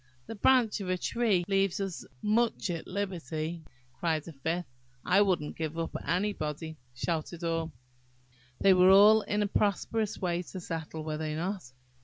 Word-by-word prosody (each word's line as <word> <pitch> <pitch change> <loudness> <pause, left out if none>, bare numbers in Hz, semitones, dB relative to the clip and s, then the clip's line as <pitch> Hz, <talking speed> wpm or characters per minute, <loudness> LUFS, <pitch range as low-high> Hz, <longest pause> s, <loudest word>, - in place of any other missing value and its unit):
"The - - -6
branch 225 -1 +3
of 185 - -4
a 185 - +1
tree 205 -3 +1
leaves 195 -1 +1
us 195 -3 -4 0.2
most 220 -2 +1
at 165 -2 -5
liberty," 170 -4 -3 0.3
cried 160 -1 -1
a 165 - -8
fifth. 165 +5 -2 0.4
"I 185 +3 +5
won't 180 -7 +1
give 160 0 -4
up 165 - -2
to - - -6
anybody," 160 -4 -2 0.2
shouted 165 +4 -3
all. 165 -1 -1 0.9
They 195 -1 +6
were 200 +4 +7
in 210 0 0
a - - 0
prosperous 210 +2 0
way 175 -1 -1
to 185 +1 -8
settle, 160 -2 -5
were 155 -1 -3
they 155 -1 -2
not? 175 -4 -4
180 Hz, 160 wpm, -30 LUFS, 160-200 Hz, 0.9 s, were